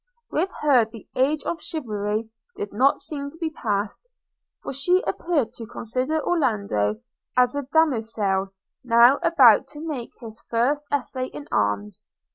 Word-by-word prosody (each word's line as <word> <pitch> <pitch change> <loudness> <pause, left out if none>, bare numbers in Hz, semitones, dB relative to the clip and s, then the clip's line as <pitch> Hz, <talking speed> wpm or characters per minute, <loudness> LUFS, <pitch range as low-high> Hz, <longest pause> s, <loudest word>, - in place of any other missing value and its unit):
With 350 +5 0
her 275 -6 +5
the 220 -1 -13
age 285 +4 +1
of 335 - -3
chivalry 220 -6 -3 0.2
did 205 - -5
not 265 +6 +3
seem 280 -2 -5
to 315 - -16
be 325 -1 -2
passed; 210 - -3 0.5
for - - -5
she 355 +8 +2
appeared 320 -9 -1
to 230 - -8
consider 255 +8 -2
Orlando 200 - 0 0.4
as 250 +1 +4
a 285 -2 -3
Damoisell, 220 -10 +1 0.3
now 240 +2 +6
about 255 -11 +6
to 295 +1 -10
make 295 -7 -5
his 225 -2 -10
first 270 +6 +1
essay 255 -2 -1
in 295 +2 -9
arms. 105 0 -1
250 Hz, 145 wpm, -24 LUFS, 215-295 Hz, 0.5 s, now